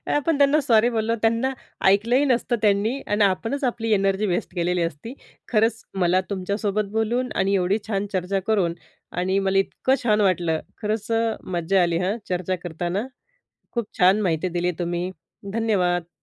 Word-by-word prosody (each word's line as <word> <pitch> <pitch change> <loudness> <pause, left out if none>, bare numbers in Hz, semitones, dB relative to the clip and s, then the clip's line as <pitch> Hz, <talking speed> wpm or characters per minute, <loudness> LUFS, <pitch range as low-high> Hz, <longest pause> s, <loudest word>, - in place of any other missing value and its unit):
आपण 295 +1 +1
त्यांना 285 +2 +4
सॉरी 235 -3 +4
बोललो 230 -1 0
त्यांना 230 +4 +2 0.4
ऐकलंही 230 +8 +4
नसतं 245 -2 +1
त्यांनी. 215 +5 +2
आणि 205 0 +2
आपणच 225 +9 -1
आपली 235 -3 -1
एनर्जी 195 0 +1
वेस्ट 180 -1 -2
केलेली 175 0 0
असती. 165 - -4 0.4
खरंच, 225 0 +2
मला 185 -1 +2
तुमच्यासोबत 200 +1 -2
बोलून 230 +4 0
आणि 195 +1 +1
एवढी 190 +2 +2
छान 205 -1 -1
चर्चा 185 +1 0
करून 190 -6 +2 0.4
आणि 190 +2 +1
मला 195 0 +2
इतकं 260 +7 +1
छान 215 -3 +3
वाटलं. 175 -5 +1 0.2
खरंच 215 +1 -2
अ, 225 -1 +1
मज्जा 180 +1 +1
आली, 170 -1 +1
हं, 185 +5 -1
चर्चा 185 0 -1
करताना. 175 +6 -3 0.6
खूप 235 -3 -2
छान 190 +4 +5
माहिती 175 -1 0
दिली 175 +1 +1
तुम्ही. 175 +1 -2 0.4
धन्यवाद. 180 -6 +1
200 Hz, 155 wpm, -23 LUFS, 180-225 Hz, 0.6 s, छान